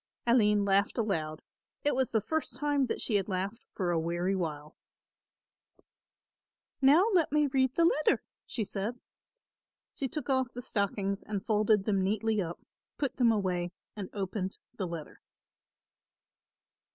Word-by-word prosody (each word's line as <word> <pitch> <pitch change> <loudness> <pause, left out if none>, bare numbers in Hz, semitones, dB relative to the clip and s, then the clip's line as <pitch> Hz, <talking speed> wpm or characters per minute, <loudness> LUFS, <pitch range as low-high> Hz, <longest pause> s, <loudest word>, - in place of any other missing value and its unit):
Aline 210 -4 +4
laughed 200 +3 +2
aloud; 160 -9 -1 0.4
it 290 - +2
was 260 0 +1
the 220 - +1
first 315 -1 -2
time 285 -1 +1
that - - -2
she 210 - +1
had 195 0 -2
laughed 195 +5 -3
for 180 -3 -1
a 170 - +2
weary 175 +4 0
while. 155 -4 -4 2.1
"Now 290 +8 +7
let 335 -6 +3
me 300 0 +4
read 260 -1 +1
the 335 - +4
letter," 305 -2 +3 0.2
she 225 - -2
said. 210 +4 -3 0.9
She 270 - -2
took 300 +4 -5
off 260 -2 +1
the 245 - -6
stockings 200 -3 -1
and 205 -2 -4
folded 215 -1 +3
them 200 -3 +2
neatly 215 +2 +1
up, 170 -1 -4 0.4
put 280 -3 -2
them 240 -3 +5
away 180 -4 -1 0.2
and 200 -3 -5
opened 195 -1 -3 0.2
the 190 - -2
letter. 165 -3 -7
210 Hz, 145 wpm, -30 LUFS, 190-260 Hz, 2.1 s, Now